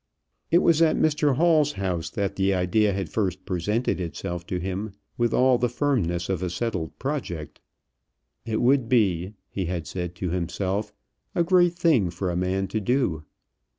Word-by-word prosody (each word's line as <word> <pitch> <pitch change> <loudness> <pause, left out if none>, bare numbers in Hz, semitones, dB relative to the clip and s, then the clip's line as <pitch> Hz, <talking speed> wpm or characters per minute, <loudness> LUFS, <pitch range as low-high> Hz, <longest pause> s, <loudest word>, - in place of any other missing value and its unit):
It 175 +3 +4
was 165 -1 +4
at 160 -1 +4
Mr 150 -3 +2
Hall's 155 -1 +3
house 90 - -2
that 100 +1 -2
the 95 0 +2
idea 95 +4 +2
had 95 -2 -2
first 95 -3 -2
presented 100 +6 -1
itself 85 0 -5
to 90 - -2
him 95 +3 -4 0.2
with 120 -1 +1
all 125 0 +4
the 125 - +1
firmness 110 - 0
of 95 -3 -2
a 90 - -1
settled 90 -3 -3
project. 125 - -4 0.8
It 110 -1 -2
would 125 -2 +3
be, 100 -5 +2
he 95 - -3
had 85 -2 -3
said 90 0 -5
to 90 0 -3
himself, 95 +4 -2 0.4
a 170 - +3
great 175 0 +4
thing 150 - +3
for 90 +2 -3
a - - -3
man 95 +2 0
to 110 - -1
do. 105 - 0
100 Hz, 170 wpm, -25 LUFS, 90-125 Hz, 0.8 s, It